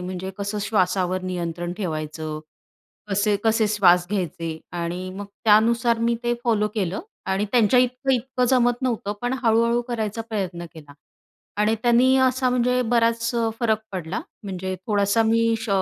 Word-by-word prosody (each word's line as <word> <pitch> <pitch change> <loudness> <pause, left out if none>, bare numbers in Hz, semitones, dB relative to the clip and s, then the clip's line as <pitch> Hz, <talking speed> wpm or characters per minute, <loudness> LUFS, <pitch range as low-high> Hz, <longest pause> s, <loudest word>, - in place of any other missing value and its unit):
म्हणजे 185 +1 -5
कसं 200 +1 -3
श्वासावर 185 -3 0
नियंत्रण 175 -1 -4
ठेवायचं. 155 -4 -4 0.7
कसे 205 +1 +2
कसे 225 0 +3
श्वास 180 -4 +4
घ्यायचे 165 -4 -3 0.2
आणि 175 +2 -4
मग 205 0 -6 0.2
त्यानुसार 230 +2 +4
मी 235 +1 +1
ते 240 0 +1
फॉलो 215 -3 +2
केलं 195 -3 -2 0.3
आणि 190 +2 +1
त्यांच्या 245 0 +4
इतकं 255 +2 0
इतकं 250 +1 0
जमत 245 -1 +2
नव्हतं, 230 -5 -1
पण 245 +1 -1
हळूहळू 235 +1 +3
करायचा 225 -2 -3
प्रयत्न 185 -5 -3
केला 150 -3 -12 0.7
आणि 215 +1 +3
त्यांनी 245 +2 +4
असा 260 0 +2
म्हणजे 250 0 +2
बराच 230 0 +2
अ, 230 -1 +1
फरक 220 -3 +2
पडला. 180 0 -4 0.2
म्हणजे 190 -1 -4
थोडासा 205 +1 +2
मी 230 +1 +2
श 225 - -6
215 Hz, 150 wpm, -23 LUFS, 185-235 Hz, 0.7 s, श्वास